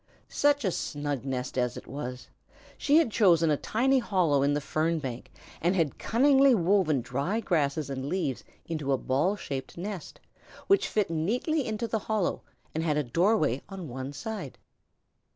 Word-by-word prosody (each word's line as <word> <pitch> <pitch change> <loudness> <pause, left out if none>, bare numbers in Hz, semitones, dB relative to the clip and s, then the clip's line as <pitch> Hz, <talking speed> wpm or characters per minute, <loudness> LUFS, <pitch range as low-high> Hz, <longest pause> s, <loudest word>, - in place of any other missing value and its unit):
Such 285 -3 +2
a 190 - +2
snug 145 -5 -3
nest 130 -1 -3
as 125 -2 -1
it - - -9
was! 125 -2 -6 0.5
She 295 +2 +3
had 325 -8 +3
chosen 170 -7 +4
a - - +4
tiny 265 - +2
hollow 180 - +2
in 140 +1 +2
the - - +1
fern 160 +3 0
bank 130 -5 -6 0.3
and 175 +3 +2
had 160 -7 0
cunningly 270 +2 +4
woven 175 - +2
dry 140 - -2
grasses 155 - 0
and 135 0 -4
leaves 170 -9 -2 0.2
into 155 -4 -2
a - - +2
ball 140 +11 +1
shaped 135 -8 -6
nest, 190 -2 -6 0.5
which 395 - +3
fitted 195 -6 0
neatly 250 - 0
into 220 +1 -2
the 220 0 -1
hollow 210 -3 -1 0.3
and 160 - -1
had 150 -3 +1
a 150 - +1
doorway 155 - +2
on 190 -6 -7
one 130 +2 -5
side. 180 - -6
165 Hz, 170 wpm, -28 LUFS, 140-215 Hz, 0.5 s, chosen